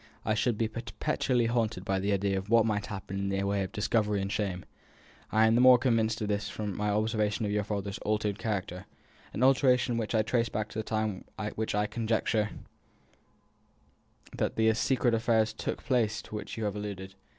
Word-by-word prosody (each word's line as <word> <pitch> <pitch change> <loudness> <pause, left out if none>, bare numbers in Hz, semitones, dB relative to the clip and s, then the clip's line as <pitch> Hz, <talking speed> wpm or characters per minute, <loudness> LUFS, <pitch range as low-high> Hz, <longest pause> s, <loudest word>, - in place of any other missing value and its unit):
I 110 - +2
should 110 +1 +1
be 115 - +1
perpetually 120 +2 -1
haunted 115 -5 -1
by 95 0 0
the 100 +2 0
idea 100 0 +1
of 95 +1 -4
what 115 -1 +5
might 105 -2 -1
happen 95 -1 -5
in 100 0 -1
the 95 0 0
way 100 0 0
of 95 - -3
discovery 105 -1 +1
and 95 +1 -2
shame. 95 -4 -2 0.7
I 110 +1 +4
am 110 - +4
the 120 - +4
more 130 0 +8
convinced 115 -3 +1
of 105 - -1
this 105 0 -1
from 105 -3 -4
my 105 0 -1
observation 105 +1 0
of 100 - -1
your 105 0 +1
father's 100 -1 -4
altered 105 -1 -1
character 95 -4 -3 0.4
an 120 - -2
alteration 130 -2 +4
which 115 0 -2
I 110 - +3
trace 115 +1 0
back 105 +1 -3
to 110 - -5
the - - -2
time 110 -3 -2 0.3
when 110 - -2
I 105 0 +2
conjecture 110 -1 0 1.9
that - - -1
the 110 0 +3
secret 120 +1 +1
affairs 110 -1 +2
took - - -4
place 120 -5 +1
to - - -13
which 105 - -6
you 110 - -3
have 105 -1 -1
alluded. 100 -2 -6
110 Hz, 195 wpm, -29 LUFS, 100-115 Hz, 1.9 s, more